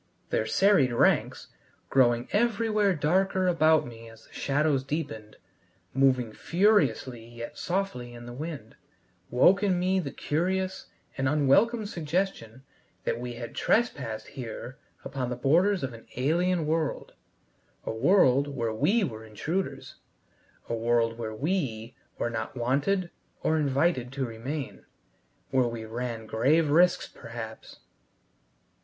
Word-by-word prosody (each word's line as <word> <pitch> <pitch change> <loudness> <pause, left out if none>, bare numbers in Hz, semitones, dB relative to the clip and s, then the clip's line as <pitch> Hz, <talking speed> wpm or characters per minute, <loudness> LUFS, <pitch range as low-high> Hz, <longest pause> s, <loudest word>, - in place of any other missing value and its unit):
Their 110 - 0
serried 190 - +4
ranks 120 - +1 0.4
growing 120 -2 +3
everywhere 215 -3 +2
darker 185 +5 +1
about 160 -3 +4
me 115 -1 -10
as 115 -1 -16
the - - -22
shadows 140 -1 +1
deepened, 135 -8 -5 0.6
moving 130 -4 +2
furiously 145 - +1
yet 115 0 -9
softly 170 -11 -3
in 120 0 -10
the 120 - -8
wind, 140 -5 -7 0.5
woke 180 +11 +5
in 190 -4 +2
me 185 +1 +2
the 155 -7 -3
curious 185 +7 -2 0.3
and 135 0 +2
unwelcome 195 - +3
suggestion 165 - -3 0.4
that - - -1
we 125 0 -5
had 120 0 -7
trespassed 140 - 0
here 125 +1 -7 0.3
upon 130 -3 -3
the 125 - -2
borders 175 +10 +2
of 130 -2 -3
an 115 - -13
alien 165 +6 +1
world, 155 0 -1 0.7
a - - -2
world 140 - +4
where 120 -6 -2
we 205 - +2
were 110 - -4
intruders, 155 - -4 0.7
a - - -3
world 115 0 +1
where 110 -2 -4
we 130 - -2 0.2
were 120 - -1
not 110 +2 -4
wanted 145 +10 0 0.3
or 160 - +2
invited 140 -3 +1
to 135 -1 -1
remain 125 +5 -6 0.7
where 130 -2 +3
we 115 -1 -5
ran 115 0 -4
grave 145 +8 +2
risks 175 +3 +4
perhaps! 115 -1 -9
135 Hz, 130 wpm, -28 LUFS, 120-180 Hz, 0.7 s, woke